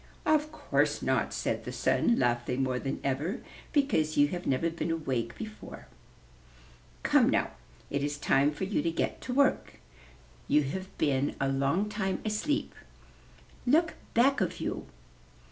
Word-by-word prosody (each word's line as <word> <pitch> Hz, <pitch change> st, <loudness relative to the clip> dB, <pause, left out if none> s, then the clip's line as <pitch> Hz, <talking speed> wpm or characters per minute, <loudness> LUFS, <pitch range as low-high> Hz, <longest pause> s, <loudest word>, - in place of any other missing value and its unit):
"Of 305 Hz, 0 st, +2 dB
course 310 Hz, -, 0 dB
not," -, -, +1 dB
said -, -, -2 dB
the -, -, -5 dB
Sun, 235 Hz, -, +2 dB
laughing 120 Hz, +1 st, +1 dB
more 130 Hz, -1 st, 0 dB
than 135 Hz, -, -3 dB
ever, 145 Hz, -, -1 dB, 0.3 s
"because 270 Hz, -, +1 dB
you 145 Hz, 0 st, +5 dB
have 175 Hz, +2 st, -4 dB
never 150 Hz, +5 st, +1 dB
been 165 Hz, 0 st, -3 dB
awake 130 Hz, -8 st, -2 dB
before. 215 Hz, -1 st, -8 dB, 1.2 s
Come, -, -, +4 dB
now, -, -, +1 dB, 0.4 s
it 140 Hz, 0 st, 0 dB
is 145 Hz, 0 st, -2 dB
time 140 Hz, 0 st, +3 dB
for 150 Hz, -, -5 dB
you 195 Hz, +2 st, 0 dB
to 170 Hz, -, 0 dB
get 165 Hz, -, -2 dB
to 250 Hz, -, -4 dB
work; 280 Hz, -1 st, +2 dB, 0.7 s
you 150 Hz, -, +4 dB
have 185 Hz, +7 st, -5 dB
been 140 Hz, -1 st, +1 dB
a 135 Hz, -, +1 dB
long 140 Hz, +9 st, +1 dB
time 205 Hz, -3 st, -2 dB
asleep. 220 Hz, +8 st, -1 dB, 0.9 s
Look 320 Hz, +5 st, +4 dB, 0.2 s
back 270 Hz, +4 st, +4 dB
of -, -, -1 dB
you.' -, -, -3 dB
165 Hz, 150 wpm, -30 LUFS, 135-215 Hz, 1.2 s, you